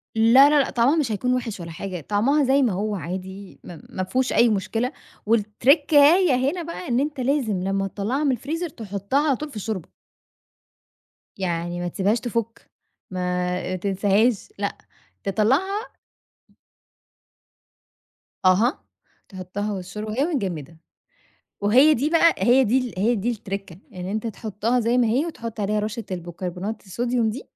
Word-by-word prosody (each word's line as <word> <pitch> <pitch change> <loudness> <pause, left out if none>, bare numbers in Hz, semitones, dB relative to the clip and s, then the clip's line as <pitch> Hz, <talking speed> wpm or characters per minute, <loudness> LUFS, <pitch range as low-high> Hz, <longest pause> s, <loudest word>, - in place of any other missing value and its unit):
لا، 235 +6 +7
لا، 295 0 +4
لا، 275 - +1
طعمَها 250 +4 +3
مش 290 -8 0
هيكون 250 +4 0
وِحِش 235 -5 -3
ولا 170 -1 -7
حاجة، 180 +1 -6
طعمَها 235 - +2
زي 270 +1 +3
ما 240 -7 +2
هو 205 +3 -2
عادي، 190 +2 -7
ما 170 -3 -10
مافيهوش 250 +8 -1
أي 240 - +5
مشكلة، 225 +4 -1 0.3
والتريكاية 285 - +4 0.2
هنا 350 +1 -5
بقى 335 +2 -7
إن 240 -2 +1
أنت 290 0 -2
لازم 250 -8 0
لمَّا 195 0 0
تطلَّعها 215 +9 -2
من 285 - +3
الفريزر 320 +8 -3
تحطَّها 220 +4 -2
على 280 - +3
طول 300 +3 -6
في 275 - -14
الشوربة. 210 -4 -4 1.5
يعني 175 -2 -2
ما 175 - -2
تسيبهاش 200 +5 0
تفُّك، 230 0 -4 0.4
ما 180 0 -2
تنساهاش 200 - +1
لأ، - - -2 0.5
تِطلَّعها 280 - 0 2.5
أها، 200 +8 +3 0.5
تحطَّها 195 +2 -4
والشوربه 200 +3 -6
وهي 260 +7 +1
متجمّده، 180 - -3 0.8
وهي 255 +10 +5
دي 285 +5 0
بقى 335 0 +5
هي 255 +2 +4
دي 240 +3 +3
ال 250 -3 -4
هي 225 +5 +2
دي 225 +2 -1
الترِكَّة 195 -5 -6 0.2
إن 180 -1 -6
أنتَ 215 +4 -3
تحطَّها 225 +2 -1
زي 235 +2 +1
ما 245 - +4
هي، 255 +8 +1
وتحط 230 -9 -6
عليها 210 +1 0
رشَّة 215 +2 -4
البيكربونات 180 +4 -5
الصوديوم 235 +3 0
دي، 250 +6 -6
220 Hz, 145 wpm, -23 LUFS, 195-260 Hz, 2.5 s, لا